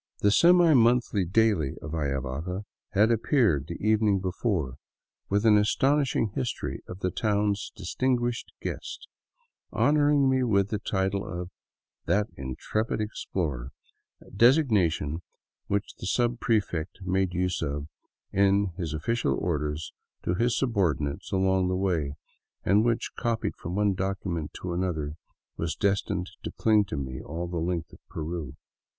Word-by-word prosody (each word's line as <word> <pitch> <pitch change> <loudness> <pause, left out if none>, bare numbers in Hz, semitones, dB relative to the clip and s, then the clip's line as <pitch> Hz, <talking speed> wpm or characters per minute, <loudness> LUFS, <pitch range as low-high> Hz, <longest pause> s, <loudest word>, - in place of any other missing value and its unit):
The 100 - +4
semi 170 - +6
monthly 120 -5 +3
daily 100 -6 +2
of 75 - -7
Ayavaca 75 +5 -2 0.3
had 105 +4 +4
appeared 110 - +2
the 85 - -5
evening 105 -2 +3
before 90 - -1 0.5
with 100 +3 +1
an 105 -2 +7
astonishing 130 +1 +2
history 120 -1 -3
of 90 +2 -8
the 90 - 0
town's 105 0 0
distinguished 120 +5 -1
guest, - - -5 0.6
honoring 145 -1 +3
me 130 0 +3
with 100 -5 +2
the 105 - -1
title 95 -1 -1
of 90 -2 -6 0.3
" - - -60
that 105 +1 +2
intrepid 65 - -2
explorer," 80 - -3 0.5
a - - -17
designation 100 - +3 0.5
which 100 0 -1
the - - -6
subprefect 110 -7 0
made 95 -1 0
use 90 0 0
of 70 +1 -2 0.5
in 100 -1 +3
his 80 -3 -2
official 115 +10 0
orders 75 -2 -2 0.3
to 85 - 0
his 115 +4 +1
subordinates 85 - 0
along 95 -1 +2
the 90 - 0
way, 85 -7 0 0.5
and 100 +3 +4
which, 115 0 0
copied 115 -2 -1
from 85 +2 -6
one 105 -1 +2
document 95 -4 -3
to 90 -1 -4
another, 85 -5 -2 0.4
was 80 0 -2
destined 100 -2 0
to - - -4
cling 110 -2 +3
to 80 - -5
me 65 -1 -4
all 85 +3 -5
the 85 0 -4
length 85 -1 -2
of - - -14
Peru. 80 -3 -5
95 Hz, 140 wpm, -27 LUFS, 85-110 Hz, 0.6 s, an